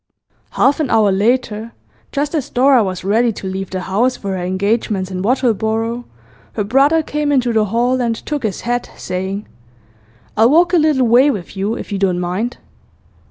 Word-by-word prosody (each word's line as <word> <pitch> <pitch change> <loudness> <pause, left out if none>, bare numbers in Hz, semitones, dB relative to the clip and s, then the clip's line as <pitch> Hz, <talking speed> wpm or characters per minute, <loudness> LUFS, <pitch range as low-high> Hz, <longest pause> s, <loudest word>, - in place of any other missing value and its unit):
Half 280 +3 +3
an 300 -5 0
hour 215 -3 +3
later, 225 +2 0 0.4
just 290 +1 -2
as 290 -3 -2
Dora 260 -1 +4
was 185 -2 -4
ready 225 +5 +2
to 200 - -9
leave 190 0 -4
the 185 -1 -4
house 220 +8 0
for 200 - -5
her 185 - -4
engagements 195 +1 -1
in 185 0 -3
Wattleborough, 230 0 0 0.5
her 210 - -1
brother 275 +9 +3
came 300 -1 -2
into 250 -4 +1
the 220 -1 +2
hall 240 +5 0
and 230 -2 0
took 295 +5 -4
his 215 -4 -3
hat, 245 +1 -2
saying: 190 +3 -4 0.9
'I'll 225 +2 +5
walk 340 +4 +4
a - - +6
little 300 -5 +3
way 245 +5 +5
with 205 -8 -4
you, 200 +4 -1
if - - -8
you 200 - -2
don't 185 -2 +1
mind. 185 +7 -2
225 Hz, 180 wpm, -17 LUFS, 195-255 Hz, 0.9 s, a